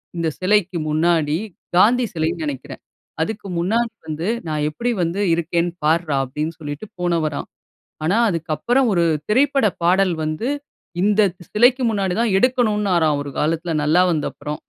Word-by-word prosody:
இந்த 170 -1 -1
சிலைக்கு 190 -1 +2
முன்னாடி 155 -1 +2 0.4
காந்தி 240 +7 +5
சிலைன்னு 165 0 -1
நெனைக்கிறேன். 140 -3 -6 0.4
அதுக்கு 205 +4 -3
முன்னாடி 225 +6 0 0.2
வந்து 160 +3 -3 0.2
"நான் 150 -1 -1
எப்பிடி 235 +11 -2
வந்து 175 +4 -1
இருக்கேன் 170 +1 0 0.2
பார்றா!" 160 -1 +2
அப்பிடின்னு 150 +5 -4
சொல்லிட்டு 145 +5 -6
போனவராம்! 165 -4 -1 0.6
ஆனா 185 +8 +2
அதுக்கப்பறம் 170 - 0
1 170 -1 +2 0.3
திரைப்பட 275 +2 +3 0.2
பாடல் 185 +1 +3
வந்து, 155 +10 -2 0.5
இந்த 210 +2 +3 0.3
சிலைக்கு 245 +4 +4
முன்னாடிதான் 205 +1 0
எடுக்கணுனாராம் 210 - +2
1 140 - -6
காலத்துல, 165 +2 -1
நல்லா 155 +4 +4
வந்தப்பறம். 150 -1 -3
175 Hz, 125 wpm, -21 LUFS, 155-210 Hz, 0.6 s, காந்தி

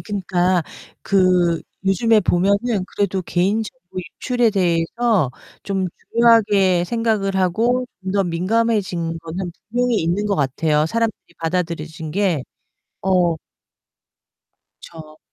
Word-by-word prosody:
그니까 185 -3 0 0.4
그 180 -4 +2 0.2
요즘에 215 +3 +3
보면은 200 +3 +1
그래도 195 -2 0
개인 190 +6 +1
정보 190 -6 -10 0.2
유출에 245 -2 +1
대해서 185 - +1 0.3
좀 195 -2 -1 0.3
중요하게 205 -6 +4
생각을 215 -2 0
하고 230 +8 +1 0.2
좀 190 0 -3
더 200 -1 +2
민감해진 185 -2 0
거는 175 +2 -5 0.2
분명히 245 0 +1
있는 175 +6 0
것 200 - +1
같아요. 150 +2 +1
사람들이 225 -3 -2
받아들여진 165 -2 -3
게. 180 -5 0 0.6
어. 180 -3 +2 1.4
그쵸. 155 -2 -12
190 Hz, 245 characters per minute, -20 LUFS, 170-215 Hz, 1.4 s, 중요하게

